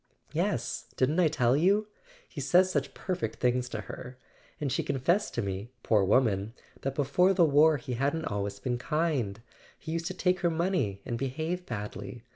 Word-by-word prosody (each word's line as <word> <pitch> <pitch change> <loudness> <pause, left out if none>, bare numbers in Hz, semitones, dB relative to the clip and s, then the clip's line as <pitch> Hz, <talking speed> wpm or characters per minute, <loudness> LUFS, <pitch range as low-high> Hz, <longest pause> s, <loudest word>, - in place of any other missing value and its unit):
"Yes: - - -1
didn't 145 +7 +2
I 175 - +5
tell 125 -5 +2
you? 200 +7 +3 0.4
He 145 - -7
says 180 +7 +4
such - - -1
perfect 185 -1 -3
things 125 0 +1
to 110 -2 -4
her. 125 +3 -9 0.4
And 145 -3 -1
she 135 - +1
confessed 145 +9 0
to - - 0
me, 100 +3 -4
poor 105 -3 +3
woman, 105 0 +2 0.3
that 135 0 -2
before 180 +7 +3
the 175 - +6
war 150 +1 +5
he 125 -1 -5
hadn't 145 +6 0
always 100 -1 -2
been 120 +4 -2
kind: 135 -9 -1 0.4
he 160 - -7
used 165 0 -2
to 185 - -4
take 185 0 +1
her 175 - +2
money, 165 - 0
and 120 -2 -3
behave 160 +7 -3
badly. 105 +1 -6
135 Hz, 180 wpm, -29 LUFS, 120-165 Hz, 0.4 s, the